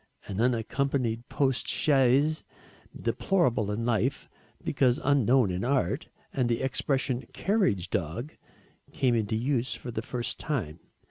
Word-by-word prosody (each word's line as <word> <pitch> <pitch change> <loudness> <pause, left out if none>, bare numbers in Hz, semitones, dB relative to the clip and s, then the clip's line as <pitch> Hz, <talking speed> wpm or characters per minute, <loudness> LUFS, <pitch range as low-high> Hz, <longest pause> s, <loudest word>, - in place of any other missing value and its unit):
An 100 +1 -2
unaccompanied 120 0 0
post 135 -3 0
chaise, 140 +2 +3 0.6
deplorable 130 - +1
in 110 +3 -2
life, 120 +4 0 0.4
because 125 -2 +2
unknown 130 -5 +3
in 90 +1 -2
art, 135 +2 0 0.2
and 125 -3 +1
the 115 +2 0
expression 130 0 0
"carriage 145 - +1
dog" 105 - -3 0.6
came 125 -2 +1
into 110 -1 0
use 125 +1 0
for 125 - -7
the 110 - -3
first 120 0 -4
time. 90 - -3
125 Hz, 125 wpm, -28 LUFS, 115-135 Hz, 0.6 s, chaise